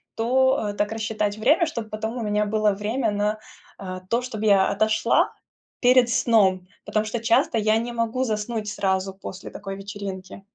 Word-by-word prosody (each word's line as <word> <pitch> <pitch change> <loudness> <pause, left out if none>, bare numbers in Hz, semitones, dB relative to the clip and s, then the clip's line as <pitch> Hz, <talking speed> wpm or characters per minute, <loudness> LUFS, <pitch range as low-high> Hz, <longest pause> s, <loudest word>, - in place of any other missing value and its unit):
то 245 -2 +2
так 205 0 0
рассчитать 215 -2 -2
время, 300 - +3
чтоб 235 -8 -5
потом 220 +2 -4
у - - -3
меня 210 0 +1
было 215 0 +2
время 220 +4 -1
на, 210 +1 -1 0.4
а, 185 -1 -6
то, 235 +1 +1
чтоб 230 -4 -6
я 200 -3 +4
отошла 215 +2 +2 0.5
перед 250 -1 +5
сном, 210 -7 +3 0.2
потому 215 0 0
что 225 +2 -3
часто 230 0 +2
я 215 0 +2
не 235 +2 -3
могу 230 +2 -1
заснуть 215 -1 -2
сразу 190 -1 -1
после 190 -1 -8
такой 195 -1 -7
вечеринки. 195 -1 -7
215 Hz, 165 wpm, -24 LUFS, 205-230 Hz, 0.5 s, перед